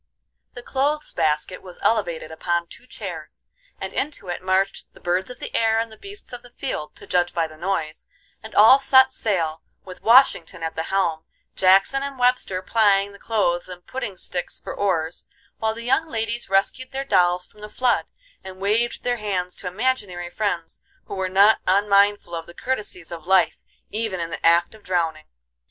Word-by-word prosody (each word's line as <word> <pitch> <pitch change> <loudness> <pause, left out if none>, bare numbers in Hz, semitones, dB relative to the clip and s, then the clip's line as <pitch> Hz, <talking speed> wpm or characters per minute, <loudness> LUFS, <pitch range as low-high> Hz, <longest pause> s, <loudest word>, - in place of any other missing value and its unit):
The 245 - -8
clothes 290 +4 -1
basket 155 +4 0
was 180 -2 -12
elevated 170 -8 0
upon 170 +1 -1
two 240 +8 -15
chairs, - - -8 0.3
and - - -5
into 285 -10 -3
it 175 - -3
marched 190 +1 0
the - - -15
birds 180 +3 -1
of 250 - -9
the - - -7
air 225 -1 +3
and 225 0 -1
the - - -11
beasts 400 -7 -9
of 245 - -6
the 245 - -15
field, 190 - -5
to - - -12
judge 175 -1 +1
by 165 -1 +2
the 155 -1 -10
noise, 160 -2 -3 0.3
and 220 - -11
all 225 +6 +8
set 260 -1 +5
sail, 165 -9 -1 0.2
with 185 -1 -10
Washington 225 -8 +4
at 160 - -3
the 160 - -1
helm, 170 -5 0 0.3
Jackson 195 +8 +4
and 275 -1 -5
Webster 245 -7 +1
plying 200 -2 +3
the 200 - -15
clothes 185 -6 0
and 180 -1 -10
pudding 235 -7 -5
sticks 175 0 -5
for - - -7
oars, 170 -4 -1 0.3
while 220 0 0
the 230 - -7
young 315 +6 +2
ladies 230 -3 -3
rescued 195 +6 +1
their 270 +1 -3
dolls 180 -6 +3
from 210 - -20
the 210 - -8
flood, 250 +3 +1 0.4
and 190 0 -9
waved 215 +5 0
their 245 0 0
hands 185 -4 -2
to 185 - -6
imaginary 185 -4 -2
friends 175 -5 -3 0.2
who - - -8
were 190 -1 -2
not 200 +4 +5
unmindful 200 -1 +3
of 165 -1 -5
the 170 - -13
courtesies 210 -10 -4
of 170 -1 -8
life 190 -2 +3 0.3
even 215 -4 -2
in 165 0 -4
the 165 - -6
act 170 +3 +4
of 220 - -16
drowning. 165 -4 -1
195 Hz, 185 wpm, -23 LUFS, 175-230 Hz, 0.4 s, all